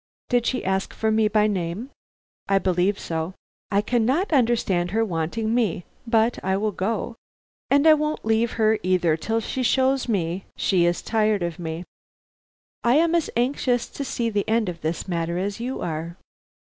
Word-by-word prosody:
Did 245 -1 +2
she 255 - -1
ask 190 0 -1
for 220 0 0
me 220 0 +3
by 210 0 +3
name?" 200 +5 -2 0.6
"I 195 - +4
believe 185 +1 +1
so." 165 +2 -4 0.3
"I 200 0 +2
cannot 250 - +1
understand 225 -9 +2
her 225 +4 +1
wanting 195 +5 -2
me, 215 -8 0 0.2
but 230 +1 +2
I 190 +1 +1
will 210 +1 0
go; 220 +4 -3 0.5
and 285 +2 +4
I 315 - +9
won't 305 -3 -1
leave 225 +1 +1
her 220 -1 +2
either 180 -3 +2
till 225 +8 -1
she 255 +3 -3
shows 265 +2 +2
me 185 -3 -1
she 180 -3 +2
is 175 - -1
tired 215 -3 +1
of 170 0 -4
me. 165 0 -4 1.0
I 240 +2 +4
am 330 +2 +3
as 335 -2 +1
anxious 245 0 +1
to 280 - -5
see 235 -3 -2
the 205 0 -1
end 220 -3 +2
of 170 -2 -7
this 160 +4 -3
matter 170 -1 -2
as 200 +3 -2
you 250 +3 -4
are." 165 +1 -4
215 Hz, 175 wpm, -24 LUFS, 180-240 Hz, 1.0 s, I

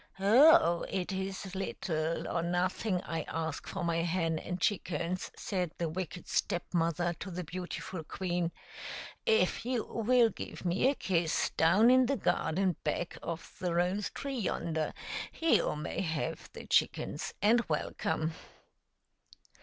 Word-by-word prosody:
" - - -21
Oh! 235 - +6
it 185 0 -2
is 190 0 -4
little 165 -4 -2
or 170 - 0
nothing 180 +3 0
I 165 -1 -3
ask 160 -2 -3
for 195 - -4
my 170 -1 +1
hen 165 -1 0
and 180 0 -4
chickens," 180 -2 -1
said 180 -4 -1
the 170 - -1
wicked 175 +1 -5
Step 175 - 0
mother 170 0 +1
to 195 - -5
the 180 0 -4
beautiful 180 0 -5
queen. 175 0 -2 0.8
"If 450 - +3
you 245 -1 0
will 235 0 +3
give - - -8
me 180 +9 +3
a 280 - +1
kiss 170 -7 +1
down 190 +10 +5
in 255 -1 +6
the 275 - +1
garden 185 -2 +1
back 175 - -2
of 165 0 -6
the 175 -2 -1
rose 180 +4 +1
tree 275 -2 -4
yonder, 165 -5 -1 0.5
you 325 - +3
may 150 - -3
have 160 -2 -3
the - - -9
chickens - - 0
and 230 +4 +5
welcome." 160 +1 -1
180 Hz, 145 wpm, -32 LUFS, 165-200 Hz, 0.8 s, Oh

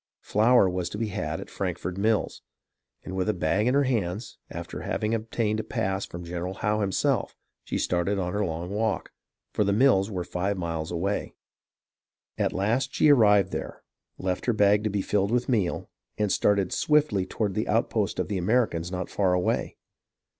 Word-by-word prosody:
Flour 110 0 +4
was 90 -1 -2
to - - -6
be 110 0 -2
had 80 -4 -3
at - - -9
Frankford 90 -1 -3
mills, 105 +2 0 0.6
and 95 - -5
with 95 +2 0
a 105 - +1
bag 95 +6 +1
in 125 - +3
her 140 - +4
hands, 110 -5 -2
after - - -6
having 110 +1 -1
obtained 110 -1 -1
a - - -2
pass 95 0 -2
from 85 +1 -8
General 90 +2 -4
Howe 105 +1 0
himself, 100 -2 0 0.3
she - - -2
started 90 +3 0
on 90 -2 -2
her 105 +1 0
long 85 0 -3
walk, 110 +2 -1 0.4
for - - +2
the 100 - +1
mills 110 -4 +4
were 90 -4 -3
five 95 +3 -2
miles 80 -3 -3
away. 95 +4 -2 1.0
At - - 0
last 110 +7 0
she 150 - +5
arrived 105 -7 +5
there, - - -5 0.3
left 90 +3 -3
her 120 - +3
bag 105 0 +4
to - - +2
be 100 -1 -1
filled 100 -1 +1
with 120 +2 +1
meal, 105 -9 0 0.3
and 105 -2 +1
started 100 -3 +2
swiftly 145 -11 +2
toward 105 -3 -2
the - - -1
outposts - - 0
of - - 0
the 100 -3 -2
Americans 90 -4 +1
not 90 -1 -3
far 95 -3 +1
away. 90 0 0
100 Hz, 180 wpm, -26 LUFS, 90-110 Hz, 1.0 s, she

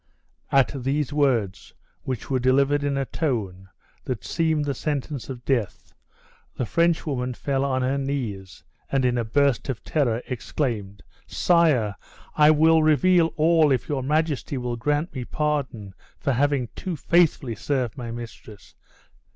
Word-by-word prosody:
At 135 0 +3
these 145 +1 -1
words, 125 -10 0 0.3
which 130 -4 -5
were 130 - +2
delivered 140 +3 +2
in 140 -1 0
a 135 - 0
tone 100 - -3 0.4
that 125 -6 -4
seemed 160 -2 0
the 140 - -1
sentence 145 -1 -4
of 125 -2 -8
death, 120 -8 -2 0.6
the 125 - -2
French 170 +5 +1
woman 125 -4 -2
fell 135 0 -1
on 130 -2 0
her 135 +2 0
knees, 115 - -4 0.3
and 135 -2 +2
in 125 -1 +2
a 120 - 0
burst 140 +3 +1
of 130 - -4
terror 125 -6 0
exclaimed, 105 - -3 0.2
"Sire, 150 - +2 0.4
I 150 0 +6
will 160 +1 +5
reveal 160 +3 +4
all 160 -1 +4
if 130 -3 0
your 140 -3 -1
majesty 150 0 -1
will 125 -1 -3
grant 145 +8 -1
me 130 -3 -4
pardon 130 -9 -2 0.3
for 140 - 0
having 135 -2 +1
too 185 -3 -4
faithfully 160 -6 +2
served 120 +1 -2
my 120 -4 -6
mistress!" 115 -3 -10
135 Hz, 150 wpm, -24 LUFS, 120-150 Hz, 0.6 s, I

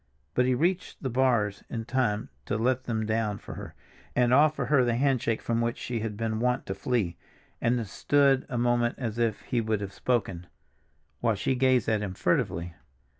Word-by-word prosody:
But 125 0 +2
he 130 - +3
reached 175 +6 -1
the 130 - -1
bars 120 -5 +1
in 115 -1 -4
time 120 -4 0 0.2
to 105 - 0
let 130 +3 +1
them 110 -2 -1
down 110 -1 0
for - - -9
her, - - -9 0.4
and 125 0 +3
offer 150 +3 +4
her 140 -4 +4
the 120 -1 +1
handshake 125 -3 +1
from 115 0 0
which 115 0 -1
she 120 -2 -3
had 105 -2 -4
been 110 -1 -1
wont 125 +2 0
to - - -3
flee, 110 -9 -1 0.4
and 120 +1 +2
then 115 - -2
stood 135 +6 +2
a 125 - -2
moment 120 0 +2
as 115 -3 -4
if 115 -3 0
he 120 - -1
would 110 -1 0
have 100 -1 -6
spoken, 95 -8 -1 0.7
while 115 -2 +1
she 105 +6 0
gazed 130 -2 +3
at 110 -2 +1
him 95 -3 -4
furtively. 85 -1 0
120 Hz, 195 wpm, -28 LUFS, 110-125 Hz, 0.7 s, offer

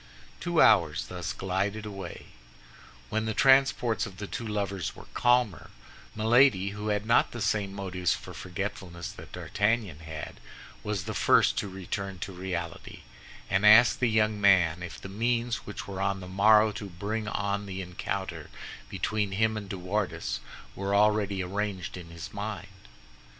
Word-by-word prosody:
Two 175 -1 0
hours 85 -8 +4
thus 90 -3 -4
glided 100 +3 -2
away. 95 -4 -8 0.8
When 110 +1 0
the 110 -1 -2
transports 130 -4 +4
of 95 -2 -12
the 105 - -5
two 115 +3 -5
lovers 100 -4 -2
were - - -12
calmer, 120 -5 +2 0.5
Milady, 110 -3 +4
who 105 +1 -6
had 105 0 0
not 115 +2 +4
the 120 - -5
same 105 -3 0
motives 95 -4 -2
for - - -10
forgetfulness 90 -2 -5
that - - -12
D'Artagnan 105 -6 0
had, 80 -1 -8 0.4
was 105 -3 -2
the 110 +3 -4
first - - +4
to - - -3
return 95 +1 -5
to 95 +3 -6
reality, 90 -2 -5 0.5
and 95 +2 +1
asked 110 +3 +7
the 125 - +2
young 110 -1 +2
man 90 -4 +4
if 85 -1 -7
the - - -8
means 115 +3 -1
which 105 - -6
were 95 -1 -5
on 100 0 0
the 90 - -8
morrow 105 +3 +5
to 105 -1 -7
bring 105 +5 -4
on 100 0 -2
the 95 0 -4
encounter 90 -2 -5 0.4
between 105 -2 -1
him 110 +2 +2
and 105 -2 -6
De 95 - -4
Wardes 90 -2 -2 0.4
were 100 +1 -1
already 105 -2 +2
arranged 95 -2 -3
in 90 -2 -9
his 85 +4 -9
mind. 105 0 -5
100 Hz, 160 wpm, -28 LUFS, 95-110 Hz, 0.8 s, asked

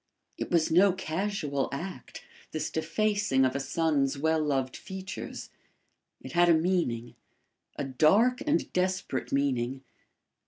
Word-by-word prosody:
It - - -5
was 165 -3 +2
no 185 +3 +5
casual 165 -5 -2
act, 140 -2 -7 0.3
this 155 -1 -2
defacing 165 -3 +1
of 130 - 0
a - - 0
son's 140 -1 0
well 160 +2 +1
loved 135 -3 -1
features. 190 0 -7 0.7
It - - -9
had 175 0 +4
a 170 - +7
meaning 160 -9 0 0.6
a - - -3
dark 175 - +3
and 305 +2 0
desperate 185 -7 -1
meaning. 135 -1 0
160 Hz, 125 wpm, -29 LUFS, 135-185 Hz, 0.7 s, a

